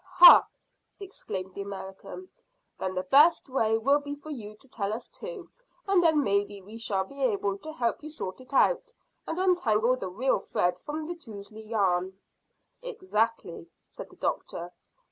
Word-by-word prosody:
"Hah!" 355 -1 +10 0.5
exclaimed 190 - -6
the 200 - -6
American. 200 - -8 0.5
"Then 185 0 -3
the 185 - -1
best 290 - +5
way 225 -4 +1
will 275 +6 +3
be 285 0 -6
for 290 +2 -10
you 215 -6 -7
to 270 - -9
tell 205 -5 -3
us 235 +2 -5
too, 450 -6 -9 0.4
and 390 -2 +4
then 315 -4 +4
maybe 200 -1 0
we 210 +4 -11
shall 195 -4 0
be 275 +9 -11
able 200 -5 0
to 315 - -8
help 240 -7 -1
you 305 - -8
sort 255 -8 -6
it 255 - -16
out, 485 - +2 0.3
and 325 - -3
untangle 255 - +2
the 195 -7 -5
real 230 +6 +1
thread 180 -1 -1
from 305 +5 -5
the 345 - -4
touzly 220 -8 -11
yarn." 190 -3 0 0.6
"Exactly," 330 - -2 0.2
said - - -10
the - - -17
doctor. 175 +1 -4
230 Hz, 165 wpm, -28 LUFS, 200-310 Hz, 0.6 s, Hah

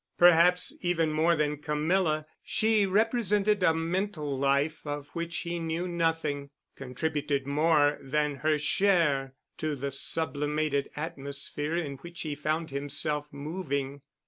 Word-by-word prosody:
Perhaps 175 +1 +6
even 165 -3 +1
more 160 +2 +3
than 150 -1 0
Camilla 155 +1 +1 0.2
she 215 -2 +2
represented 210 -1 +2
a 170 - +5
mental 165 -2 -2
life 140 +3 +1
of 145 -1 -5
which 170 0 -4
he 170 0 -3
knew 165 +2 -2
nothing, 165 -4 -1 0.3
contributed 140 +1 -2
more 150 0 +3
than 150 +1 -1
her 155 +3 +1
share 150 -6 +2 0.2
to 155 -1 -1
the 140 +1 -4
sublimated 145 0 0
atmosphere 145 0 -3
in 145 -5 -3
which 170 +5 -9
he 155 -2 -3
found 155 +2 -2
himself 145 +1 -2
moving. 140 -2 -4
155 Hz, 125 wpm, -28 LUFS, 145-170 Hz, 0.3 s, Perhaps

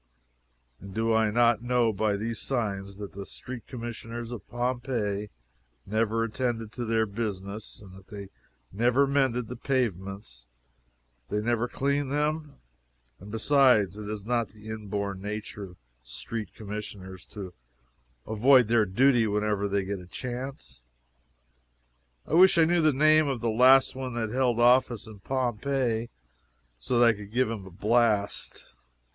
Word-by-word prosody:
And 100 0 -11
do 115 0 +1
I 110 -1 +3
not 120 0 +3
know 120 -2 +2
by 105 0 0
these 115 +1 -3
signs 100 -6 -3
that 100 -1 -8
Street 125 -2 -8
Commissioners 115 -1 -6
of 120 - -8
Pompeii 120 -4 -2 0.6
never 110 +2 0
attended 115 -1 -2
to 120 +1 -5
their 110 0 +2
business, 100 -1 -5
and 95 -3 -13
that 95 - -12
if 95 - -21
they 100 -2 -9 0.4
never 125 +6 +3
mended 135 -4 +1
the 125 - -6
pavements 100 - -3 0.8
they 105 - 0
never 120 +2 0
cleaned 140 +2 -1
them? 150 +1 -1 0.6
And, 100 - -11
besides, 115 - +4
is 105 -1 -6
it - - -14
not 120 -2 +1
the 105 +2 -13
inborn 100 -3 -4
nature 105 0 -5
of 90 -1 -14 0.3
Street 90 - -6
Commissioners 100 -3 -7
to 95 -4 -8 0.7
avoid 120 +2 +5
their 115 -2 +4
duty 120 +3 +3
whenever 105 -1 0
they 100 -1 0
get 100 0 -3
a 90 - -12
chance? 120 - -7 1.4
I - - -6
wish 190 +2 +7
I 165 - +6
knew 175 +1 +2
the 155 -1 +4
name 155 +2 +4
of 135 -3 -1
the 115 0 0
last 130 +4 +6
one 130 -2 -5
that 110 -2 -2
held 125 -2 +1
office 120 -2 +4
in 110 -2 -12
Pompeii 120 0 -1 0.7
so 120 - -1
that 120 - +6
I 115 - +6
could 105 -1 -10
give 125 0 +1
him 100 -4 -6
a - - -9
blast. 105 +2 0
115 Hz, 150 wpm, -27 LUFS, 105-125 Hz, 1.4 s, wish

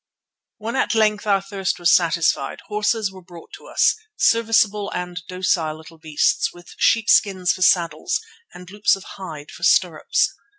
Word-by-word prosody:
When 225 +3 -5
at 255 - 0
length 215 -1 +1
our 195 -1 +2
thirst 195 -2 -3
was 175 0 +3
satisfied, 170 -1 +1
horses 210 0 0
were 190 -1 -13
brought 175 -2 -15
to - - -12
us, - - +2 0.2
serviceable 220 - +2
and 180 0 -5
docile 180 -4 -1
little 160 +1 -15
beasts 155 -1 0
with 175 0 -15
sheepskins 195 -5 +3
for 185 - -9
saddles 175 - +2 0.3
and 180 +1 -13
loops 205 -1 +2
of 195 - -11
hide 155 -6 -9
for - - -13
stirrups. - - +2
185 Hz, 155 wpm, -21 LUFS, 175-210 Hz, 0.3 s, was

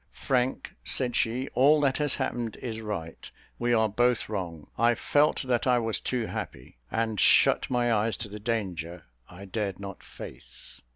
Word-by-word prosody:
"Frank," 130 -1 -1
said 125 -2 +1
she, 125 +4 0
"all 145 +4 +5
that 135 -1 +2
has 145 -2 +1
happened 115 -3 -2
is 115 -2 -5
right. 100 -7 -6 0.3
We 120 0 +1
are 110 -2 +4
both 120 +2 +1
wrong. 85 -7 -4
I 120 +1 +3
felt 145 +6 +2
that 125 -1 0
I 125 -1 +5
was 115 -2 0
too 125 -3 -1
happy, - - -7
and 110 -2 -1
shut - - +5
my 120 -2 +2
eyes 110 +1 +1
to - - -8
the 105 +1 -8
danger 90 -7 -3 0.3
I 90 +3 -10
dared 100 -1 -3
not 100 -1 -8
face. - - -10
115 Hz, 170 wpm, -28 LUFS, 100-125 Hz, 0.3 s, all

